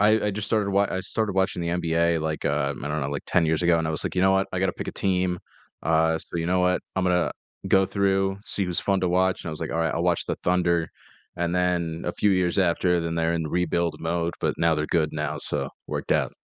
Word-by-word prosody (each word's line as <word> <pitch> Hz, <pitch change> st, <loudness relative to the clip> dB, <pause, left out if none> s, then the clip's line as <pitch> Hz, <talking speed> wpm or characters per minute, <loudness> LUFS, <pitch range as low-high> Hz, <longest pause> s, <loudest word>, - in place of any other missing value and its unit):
I 105 Hz, -, +5 dB, 0.2 s
I -, -, +2 dB
just 100 Hz, +1 st, -4 dB
started 105 Hz, -3 st, +1 dB
wa 100 Hz, +1 st, +3 dB
I 95 Hz, -, -1 dB
started 105 Hz, +1 st, -2 dB
watching 95 Hz, -2 st, 0 dB
the 85 Hz, -, -2 dB
NBA, 85 Hz, -1 st, +1 dB
like, 80 Hz, 0 st, -3 dB
uh, 70 Hz, -1 st, 0 dB
I 75 Hz, -, -3 dB
don't 75 Hz, +1 st, -1 dB
know, 70 Hz, -, -2 dB
like, 70 Hz, -1 st, -4 dB
10 85 Hz, -2 st, +2 dB
years 80 Hz, +1 st, +1 dB
ago. 85 Hz, -1 st, +4 dB
And 80 Hz, -, -1 dB
I -, -, -1 dB
was 80 Hz, -, -2 dB
like, -, -, -3 dB
"You 90 Hz, -, +3 dB
know 95 Hz, 0 st, +5 dB
what? 95 Hz, 0 st, +2 dB
I 95 Hz, -, -1 dB
gotta 95 Hz, 0 st, +1 dB
pick -, -, -6 dB
a -, -, -4 dB
team. 90 Hz, -2 st, 0 dB, 0.4 s
Uh, 80 Hz, 0 st, +2 dB
so 85 Hz, -, -7 dB
you 85 Hz, 0 st, -1 dB
know 90 Hz, +1 st, +2 dB
what? 90 Hz, 0 st, +2 dB, 0.2 s
I'm 95 Hz, -, +1 dB
gonna 90 Hz, -1 st, +2 dB, 0.4 s
go 95 Hz, 0 st, +5 dB
through, 95 Hz, 0 st, +1 dB
see 100 Hz, -, -2 dB
who's 90 Hz, -1 st, -1 dB
fun 95 Hz, -1 st, +1 dB
to 90 Hz, -, +1 dB
watch." 95 Hz, +1 st, +1 dB
And -, -, -4 dB
I -, -, -2 dB
was 80 Hz, -, -7 dB
like, -, -, -3 dB
"Alright, 80 Hz, 0 st, 0 dB
I'll 85 Hz, -, -1 dB
watch 90 Hz, -1 st, +1 dB
the -, -, -2 dB
Thunder." 85 Hz, -2 st, +2 dB, 0.5 s
And 85 Hz, 0 st, -1 dB
then 85 Hz, -2 st, 0 dB
a 85 Hz, -, 0 dB
few 105 Hz, -, +2 dB
years 90 Hz, 0 st, +1 dB
after, 90 Hz, -1 st, +2 dB
then 85 Hz, 0 st, -2 dB
they're 85 Hz, 0 st, +1 dB
in 80 Hz, -1 st, -1 dB
rebuild 85 Hz, 0 st, 0 dB
mode, 85 Hz, +1 st, -1 dB
but -, -, 0 dB
now 85 Hz, -1 st, +3 dB
they're 75 Hz, 0 st, -1 dB
good 80 Hz, -2 st, +1 dB
now, 75 Hz, 0 st, -3 dB
so -, -, -3 dB, 0.2 s
worked -, -, -2 dB
out. -, -, +1 dB
85 Hz, 265 wpm, -25 LUFS, 80-95 Hz, 0.5 s, I